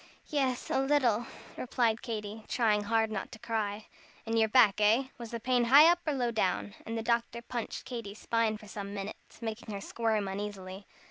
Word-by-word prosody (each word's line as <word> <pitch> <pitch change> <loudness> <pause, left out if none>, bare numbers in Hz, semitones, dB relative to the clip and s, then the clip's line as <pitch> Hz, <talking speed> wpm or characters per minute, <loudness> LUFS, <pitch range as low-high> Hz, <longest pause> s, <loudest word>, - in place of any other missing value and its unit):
"Yes, 265 -5 -1
a - - +2
little," 255 -5 +2 0.3
replied 235 -3 0
Katy, 215 -2 -5
trying 210 -4 +2
hard 225 0 +2
not - - -4
to - - -8
cry. 220 -2 -3 0.4
"In 225 0 -1
your 220 -1 +3
back, 210 -3 +5
eh? 230 +6 +4
Was 235 -1 -7
the 235 - -4
pain 245 +1 +2
high 280 +6 +9
up 350 - +1
or 300 - +2
low 245 -3 0
down?" 100 - 0
And 230 +1 -3
the 225 - -3
doctor 235 0 0
punched 240 -1 -5
Katy's 230 -5 -6
spine 230 -1 0
for 210 -1 -14
some 200 0 -6
minutes, 200 +4 -8
making 220 0 -5
her 200 - -4
squirm 220 0 -1
uneasily. 195 -1 -6
225 Hz, 190 wpm, -31 LUFS, 210-240 Hz, 0.4 s, high